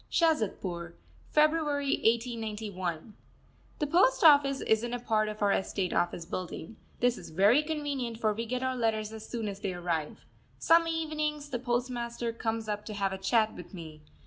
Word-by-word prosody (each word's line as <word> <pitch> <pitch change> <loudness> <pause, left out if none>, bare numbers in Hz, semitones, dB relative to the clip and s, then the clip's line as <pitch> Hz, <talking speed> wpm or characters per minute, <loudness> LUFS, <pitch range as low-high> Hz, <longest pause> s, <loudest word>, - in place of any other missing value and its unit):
SHAZADPUR, 190 - 0 0.3
February 300 -2 +2
1891. 215 -6 -1 0.6
The 300 - 0
post 355 +12 +3
office 285 -3 +6
is 220 +1 +2
in 240 0 -2
a - - -4
part 215 -2 +1
of 215 0 -4
our 200 - +4
estate 190 -1 -1
office 175 -1 0
building, 180 +3 -6 0.2
this 245 0 +2
is - - -10
very 200 - +4
convenient, 290 -6 -3
for 215 -2 +2
we 230 +2 -4
get 250 +2 -2
our 260 0 0
letters 220 -3 -1
as 220 -1 -9
soon 230 -3 -3
as 200 -1 -5
they 200 -3 -3
arrive. 170 -3 -3 0.3
Some 330 0 +4
evenings 305 -2 -2
the 245 - -1
postmaster 240 -1 -2
comes 225 -1 -3
up 210 0 -3
to 215 - -5
have 195 -1 0
a 190 - -5
chat 220 +3 +2
with - - -10
me. 160 -3 -9
230 Hz, 170 wpm, -30 LUFS, 205-275 Hz, 0.6 s, office